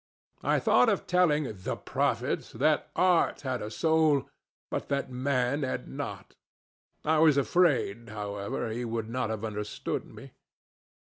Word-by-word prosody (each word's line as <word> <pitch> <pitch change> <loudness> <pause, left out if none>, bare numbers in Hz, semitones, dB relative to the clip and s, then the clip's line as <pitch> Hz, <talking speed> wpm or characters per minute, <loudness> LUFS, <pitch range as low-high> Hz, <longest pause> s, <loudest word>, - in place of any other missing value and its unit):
I - - +2
thought 245 - +4
of 205 - 0
telling 175 -4 +3
the 95 - -3
prophet - - -1
that - - +2
art 180 -2 +3
had 130 -3 -2
a 105 - -4
soul, 155 +2 +2 0.4
but - - -3
that 140 -2 -1
man 130 +1 0
had 130 - -3
not. - - -6 0.7
I 160 +1 +3
am 160 - +6
afraid, 140 - +2
however, 105 +1 -4
he 120 +2 -3
would 115 -1 -3
not 125 -2 -1
have 110 0 -3
understood 105 -1 -4
me." - - -12
130 Hz, 140 wpm, -29 LUFS, 110-155 Hz, 0.7 s, am